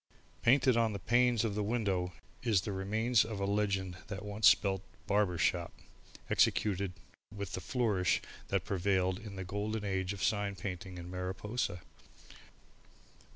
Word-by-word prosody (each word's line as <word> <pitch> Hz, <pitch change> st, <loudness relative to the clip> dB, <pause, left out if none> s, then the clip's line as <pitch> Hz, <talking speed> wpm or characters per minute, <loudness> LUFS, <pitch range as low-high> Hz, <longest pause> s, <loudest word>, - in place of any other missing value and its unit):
Painted 130 Hz, 0 st, +5 dB
on 115 Hz, -2 st, +2 dB
the -, -, -2 dB
panes 120 Hz, +1 st, +3 dB
of 110 Hz, -, -1 dB
the 105 Hz, -, -1 dB
window 100 Hz, -5 st, 0 dB, 0.3 s
is 110 Hz, -6 st, +3 dB
the 100 Hz, -, -4 dB
remains 110 Hz, +5 st, +2 dB
of 110 Hz, -2 st, -5 dB
a 100 Hz, -, 0 dB
legend 100 Hz, -2 st, 0 dB
that 105 Hz, 0 st, -6 dB
once 105 Hz, -1 st, +3 dB
spelt 95 Hz, +2 st, +4 dB, 0.2 s
BARBER 100 Hz, -4 st, +2 dB
SHOP, 85 Hz, +1 st, +1 dB, 0.6 s
executed 100 Hz, -3 st, +2 dB, 0.4 s
with 100 Hz, -3 st, -5 dB
the 95 Hz, -, -3 dB
flourishes 105 Hz, -4 st, +1 dB, 0.3 s
that -, -, 0 dB
prevailed 95 Hz, -1 st, +1 dB
in 105 Hz, -3 st, -9 dB
the 95 Hz, -, -4 dB
golden 105 Hz, +3 st, -2 dB
age 95 Hz, -1 st, -1 dB
of 100 Hz, -3 st, -4 dB
sign 100 Hz, -2 st, +1 dB
painting 90 Hz, 0 st, -6 dB
in 90 Hz, 0 st, -8 dB
Mariposa. 90 Hz, +1 st, -3 dB
100 Hz, 150 wpm, -33 LUFS, 95-110 Hz, 0.6 s, Painted